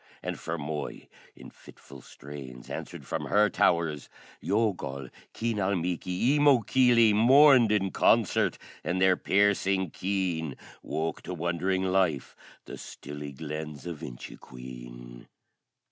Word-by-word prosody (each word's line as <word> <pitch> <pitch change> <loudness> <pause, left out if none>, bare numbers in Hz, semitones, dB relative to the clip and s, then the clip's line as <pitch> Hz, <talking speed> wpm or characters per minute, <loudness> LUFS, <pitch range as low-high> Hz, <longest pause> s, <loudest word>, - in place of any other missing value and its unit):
And - - -3
Fermoy 75 -2 -5 0.3
in - - -13
fitful 70 -1 -15
strains 65 -3 -11
Answered - - -7
from - - -3
her 105 +1 +3
towers. 80 -5 +1 0.3
Youghal, 90 - -1 0.3
Keenalmeaky, 100 - 0
Eemokilly, 125 -4 +4
Mourned 130 +1 +6
in 95 -3 +1
concert, - - +2 0.3
and 90 +2 -1
their 95 0 +4
piercing 95 -3 +1
keen 90 -7 -2 0.3
Woke 80 +1 -3
to 90 - -6
wondering 90 +3 -1
life 95 -6 0 0.3
the - - -9
stilly 75 0 -8
Glens 75 +1 -7
of 85 -4 -6
Inchiqueen. - - -10
90 Hz, 105 wpm, -28 LUFS, 75-100 Hz, 0.3 s, Mourned